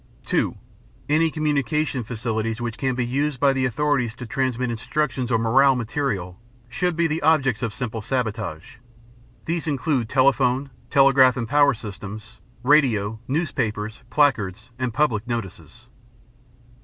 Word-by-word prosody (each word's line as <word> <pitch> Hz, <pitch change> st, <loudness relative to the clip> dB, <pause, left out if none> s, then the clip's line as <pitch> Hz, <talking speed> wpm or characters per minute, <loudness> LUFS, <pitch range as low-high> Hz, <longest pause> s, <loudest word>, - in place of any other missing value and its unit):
(2) -, -, 0 dB, 0.5 s
Any 160 Hz, +2 st, +3 dB
communications 150 Hz, -4 st, -1 dB
facilities 115 Hz, -1 st, -2 dB
which 120 Hz, -2 st, -3 dB
can 130 Hz, -2 st, -1 dB
be 125 Hz, -1 st, -1 dB
used 140 Hz, +2 st, -1 dB
by 140 Hz, 0 st, +4 dB
the 130 Hz, -1 st, 0 dB
authorities 125 Hz, -2 st, 0 dB
to 125 Hz, -, -8 dB
transmit 125 Hz, 0 st, -1 dB
instructions 125 Hz, +1 st, -2 dB
or 115 Hz, -, +4 dB
morale 130 Hz, +4 st, +4 dB
material 110 Hz, -7 st, -3 dB, 0.3 s
should 175 Hz, +8 st, -1 dB
be 170 Hz, +1 st, +1 dB
the 160 Hz, 0 st, -1 dB
objects 140 Hz, -7 st, +2 dB
of 115 Hz, -, -1 dB
simple 115 Hz, -1 st, -4 dB
sabotage. 105 Hz, -, -3 dB, 0.7 s
These 165 Hz, 0 st, -2 dB
include 135 Hz, -5 st, 0 dB
telephone, 135 Hz, 0 st, +2 dB, 0.2 s
telegraph 135 Hz, -2 st, +5 dB
and 115 Hz, -2 st, -2 dB
power 145 Hz, +1 st, +4 dB
systems, 105 Hz, 0 st, -9 dB, 0.2 s
radio, 115 Hz, -7 st, +3 dB
newspapers, 115 Hz, -8 st, -2 dB
placards, 115 Hz, -5 st, +1 dB
and 125 Hz, -2 st, -1 dB
public 115 Hz, -3 st, 0 dB
notices. 115 Hz, -6 st, -6 dB
125 Hz, 130 wpm, -23 LUFS, 115-145 Hz, 0.7 s, telegraph